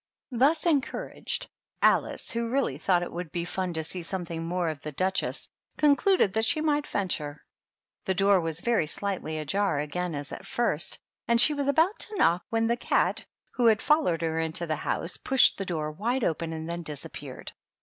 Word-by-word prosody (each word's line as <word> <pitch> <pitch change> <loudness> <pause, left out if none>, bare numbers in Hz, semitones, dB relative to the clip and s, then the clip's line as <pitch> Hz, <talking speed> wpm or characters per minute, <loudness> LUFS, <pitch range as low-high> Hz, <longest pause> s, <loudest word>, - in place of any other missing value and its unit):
Thus 280 +7 +2
encouraged, 305 -3 -1 0.3
Alice, - - +2
who 235 -1 -2
really 245 - 0
thought 175 +1 +2
it - - -6
would 175 -2 -6
be 170 -1 -2
fan 185 0 -3
to 160 -1 -2
see 175 +3 -2
something 170 -2 -4
more 175 +1 -1
of 155 -2 -6
the 150 - -6
Duchess, 185 +6 -1 0.3
concluded 300 - +3
that 220 +1 +1
she 310 - +2
might 295 -1 0
venture. 155 -7 -3 0.6
The 190 - 0
door 195 0 +4
was 165 0 -3
very 230 -10 +1
slightly 175 -3 -2
ajar 175 +3 0
again 160 +3 -3
as 145 0 -5
at - - -8
first, 230 -10 +1 0.3
and 235 0 +3
she 300 - +7
was 285 -1 -2
about 325 +8 +2
to 430 - -1
knock, 175 - +3
when 225 0 +1
the 235 +1 +1
cat, - - +1 0.3
who 245 -2 +2
had 220 -2 +5
followed 300 - +2
her 160 0 -1
into 160 +1 +2
the 155 -2 -2
house, 165 +3 -2
pushed 265 -5 +4
the 195 - -2
door 155 -4 -3
wide 235 +10 -1
open 165 -1 -1
and 160 0 -5
then 170 0 -4
disappeared. 150 -4 -7
185 Hz, 190 wpm, -27 LUFS, 160-240 Hz, 0.6 s, she